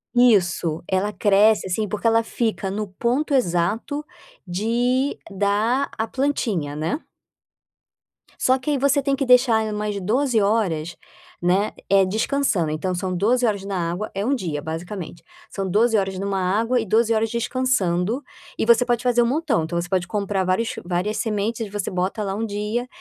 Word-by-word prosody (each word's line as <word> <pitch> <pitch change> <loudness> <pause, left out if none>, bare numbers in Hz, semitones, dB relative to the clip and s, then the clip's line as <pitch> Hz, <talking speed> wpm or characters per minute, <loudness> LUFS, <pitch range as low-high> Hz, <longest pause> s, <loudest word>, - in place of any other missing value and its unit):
Isso, 180 -9 +3
ela 195 +2 0
cresce, 205 +2 +3
assim, 210 +3 -1
porque 210 +3 -2
ela 230 0 +4
fica 220 -4 -2
no 210 +1 -3
ponto 245 +10 -1
exato 225 - 0 0.4
de 240 +8 0
dar 210 +7 +1
a 220 - -1
plantinha, 220 - -1
né. 160 - -2 1.4
Só 260 +1 +3
que 280 +3 -3
aí 285 - +1
você 280 +1 +2
tem 275 0 +1
que 275 0 -1
deixar 250 -3 +5
ela 215 -1 -3
mais 210 -1 -2
12 240 +5 +1
horas, 185 -6 0 0.5
né, 185 +4 +1 0.2
eh, 195 -1 +5
descansando. 215 - 0
Então 180 +4 -2
são 185 +1 -2
12 240 +7 +2
horas 205 -4 0
na 180 -4 -2
água, 200 +5 -4
é 200 +1 -1
1 275 +3 +2
dia 160 - -3
basicamente, 170 +3 -6 0.3
são 195 -1 -4
12 225 +4 +3
horas 190 -1 -1
em 190 - -4
1 195 -1 -1
água 220 +7 +1
e 220 - -2
12 225 +3 +2
horas 220 0 +1
descansando, 235 -3 0 0.3
e - - 0
você 235 +1 +5
pode 240 -1 0
fazer 245 -1 +3
um - - +1
montão, 265 - +1
então 170 +2 -2
você 175 - -7
pode 185 -3 0
comprar 200 -1 -1
vários 185 +6 +1 0.2
várias 185 +4 -1
sementes 220 +1 -2
e - - -13
você 205 -1 -3
bota 185 +4 -2
lá 195 - -2
1 225 - -2
dia, 215 +4 -3
210 Hz, 175 wpm, -22 LUFS, 185-240 Hz, 1.4 s, deixar